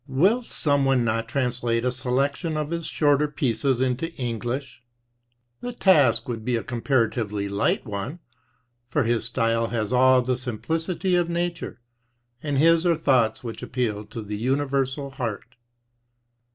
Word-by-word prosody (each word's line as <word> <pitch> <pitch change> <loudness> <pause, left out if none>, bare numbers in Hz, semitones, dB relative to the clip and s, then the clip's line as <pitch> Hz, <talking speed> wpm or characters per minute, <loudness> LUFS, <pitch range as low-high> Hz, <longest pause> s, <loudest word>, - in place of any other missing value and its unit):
Will 185 - +3
some 145 - 0
one 135 -2 +3
not 115 0 -1
translate 120 -2 0
a 125 - +2
selection 140 +5 -1
of 150 +1 -3
his 170 -2 -3
shorter 145 -1 +2
pieces 130 -2 0
into 130 +6 -1
English? 120 +1 -4 0.8
The 245 0 -5
task 140 - +4
would 115 -3 -4
be 125 +1 0
a 115 - -2
comparatively 115 -4 0
light 100 0 0
one, 105 - -5 0.7
for 135 +3 +1
his 115 0 0
style 115 -1 +1
has 115 0 -2
all 130 0 +5
the 125 0 0
simplicity 165 - -2
of 175 -1 +1
nature, 170 -6 -3 0.6
and 145 -2 -1
his 165 +3 +5
are 175 -2 +3
thoughts 125 -8 +2
which 115 -2 -6
appeal 110 -5 -2
to 115 - -7
the 105 0 -5
universal 135 +2 -1
heart. 115 -6 -5
130 Hz, 145 wpm, -24 LUFS, 115-145 Hz, 0.8 s, all